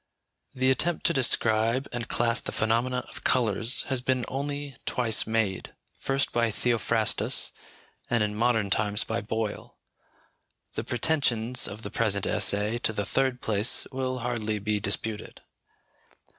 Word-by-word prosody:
The 130 0 +3
attempt 170 +6 0
to 170 - +5
describe 115 -1 +2
and 120 -1 -4
class 115 0 +1
the - - -6
phenomena 120 +3 0
of - - -9
colours 115 0 +2
has 130 -3 -1
been 130 -1 0
only 140 0 -4
twice 115 -4 +2
made: 110 -4 -1 0.2
first 135 0 0
by 120 -1 +2
Theophrastus, 115 0 0 0.6
and 120 -3 +2
in 105 0 -1
modern 110 -2 +1
times 105 +1 +2
by 115 +1 -2
Boyle. 110 0 -4 1.0
The - - -3
pretensions 125 -4 +1
of 105 +3 -8
the 105 - -6
present 100 -3 +2
essay 105 +3 +2
to 115 - 0
the 105 -1 -2
third 130 0 0
place 105 +1 +1
will 130 -1 -2
hardly 110 -3 -2
be 105 +1 -1
disputed. 105 +2 -2
115 Hz, 140 wpm, -27 LUFS, 110-130 Hz, 1.0 s, to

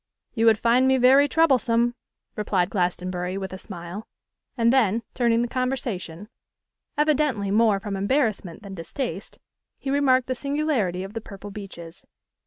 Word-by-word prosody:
'You 230 -1 +2
would 220 -1 +6
find 240 +3 +3
me 265 0 +4
very 265 +3 +6
troublesome,' 240 -7 +2 0.4
replied 195 -3 0
Glastonbury, 180 0 -2
with 190 -1 -5
a 190 - -7
smile; 185 +1 -8 0.5
and 235 +1 +3
then, 230 -3 +2
turning 235 -1 +2
the - - -1
conversation, 235 -8 -3 0.7
evidently 295 -9 +1
more 215 -1 +3
from 200 0 -5
embarrassment 205 - -1
than 200 -1 -8
distaste, 190 - -5 0.4
he 270 - -4
remarked 260 -3 +3
the 255 - -2
singularity 275 - -1
of 195 +2 -8
the 225 - -4
purple 205 -1 -10
beeches. 180 -5 -10
225 Hz, 145 wpm, -24 LUFS, 195-255 Hz, 0.7 s, would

